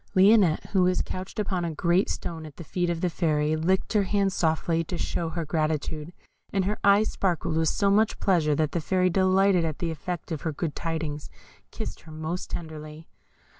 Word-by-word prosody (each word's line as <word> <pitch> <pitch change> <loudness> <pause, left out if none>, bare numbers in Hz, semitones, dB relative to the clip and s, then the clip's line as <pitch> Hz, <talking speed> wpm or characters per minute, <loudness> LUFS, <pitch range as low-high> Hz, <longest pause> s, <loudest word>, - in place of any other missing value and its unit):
Lionette, 190 -3 +4
who 190 - +3
was 180 0 +2
couched 185 +1 -7
upon 195 -4 -1
a 165 -2 -3
great 175 +5 +2
stone 165 -2 -4
at 145 - -13
the 170 - -7
feet 175 +3 -1
of 170 -1 -2
the 180 - +1
Fairy, 155 -2 +1
licked 185 +7 0
her 210 - +4
hand 195 0 +1
softly, 165 0 +1
to 175 +2 -5
show 165 0 -2
her 165 0 -3
gratitude, 155 0 -2 0.4
and 195 -2 +1
her 210 +2 -1
eyes 200 +2 +5
sparkled 175 -4 -1
with 160 -1 +2
so 200 -1 +2
much 215 +2 +2
pleasure 160 -6 +2
that 155 -1 0
the 170 - -1
Fairy, 185 +3 +2
delighted 190 0 +3
at 155 -2 -2
the 170 -1 -2
effect 175 +2 -5
of 155 - -3
her 160 - -2
good 155 +1 -3
tidings, 160 -3 -3 0.4
kissed - - -6
her 160 - -14
most 160 +3 -4
tenderly. 155 -1 -7
170 Hz, 200 wpm, -26 LUFS, 155-190 Hz, 0.4 s, eyes